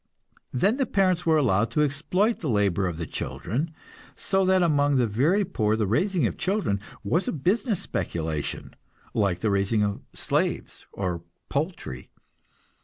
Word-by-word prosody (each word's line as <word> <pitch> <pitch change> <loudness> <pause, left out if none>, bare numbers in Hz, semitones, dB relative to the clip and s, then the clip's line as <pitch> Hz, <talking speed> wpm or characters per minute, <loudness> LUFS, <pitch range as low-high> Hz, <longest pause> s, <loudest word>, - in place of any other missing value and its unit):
Then 200 - +2
the 270 -3 +1
parents 185 -4 +2
were 160 -1 +5
allowed 115 -6 +2
to 150 +6 +2
exploit 160 - +1
the 155 - -3
labor 100 -4 +2
of 85 -3 -4
the 85 - -3
children, 120 - -3 0.5
so 195 0 +1
that 185 -1 +4
among 145 -3 +3
the 125 -2 +4
very 150 - +2
poor 110 - +1
the 110 -1 +1
raising 170 - +1
of - - -2
children 190 - 0 0.2
was 170 - +1
a - - +1
business 195 - 0
speculation, 80 -3 -3 0.4
like 100 -5 +1
the 110 - +1
raising 100 +2 +2
of 100 -1 -1
slaves - - -2
or 90 -4 -3 0.3
poultry. 140 - -3
140 Hz, 155 wpm, -26 LUFS, -, 0.5 s, were